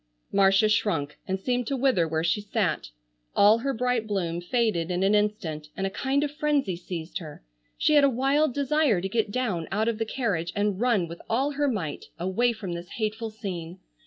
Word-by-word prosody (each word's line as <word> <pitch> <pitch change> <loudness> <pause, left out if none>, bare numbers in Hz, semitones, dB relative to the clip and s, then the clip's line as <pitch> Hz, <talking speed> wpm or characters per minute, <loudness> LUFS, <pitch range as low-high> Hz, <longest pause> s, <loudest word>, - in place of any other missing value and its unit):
Marcia 195 +1 +5
shrunk 165 -9 0
and 190 0 -1
seemed 245 +3 -1
to 275 - -1
wither 245 -11 +2
where 160 0 -1
she 170 +5 +1
sat. 200 - -1 0.5
All 210 +3 +6
her 275 +3 -1
bright 250 -2 0
bloom 175 -5 -1
faded 185 -4 0
in 180 +1 0
an 195 +2 +3
instant 205 -8 0
and 195 - -1
a 195 - -2
kind 275 +6 0
of 290 - -1
frenzy 295 - 0
seized 170 -1 -6
her. 155 - -10 0.3
She 305 - +3
had 290 -1 +6
a 280 - +6
wild 275 +4 +2
desire 280 - +2
to 190 - -2
get 220 +1 0
down 205 -8 -1
out 215 +3 +1
of 230 -1 -1
the 225 - 0
carriage 200 -9 -1
and 205 -1 0
run 230 -8 +2
with 170 +1 -9
all 265 +6 +1
her 290 0 0
might 185 - -3
away 190 +8 +1
from 205 -6 -5
this 170 0 -7
hateful 220 0 -2
scene. 185 -5 -6
210 Hz, 200 wpm, -26 LUFS, 175-250 Hz, 0.5 s, All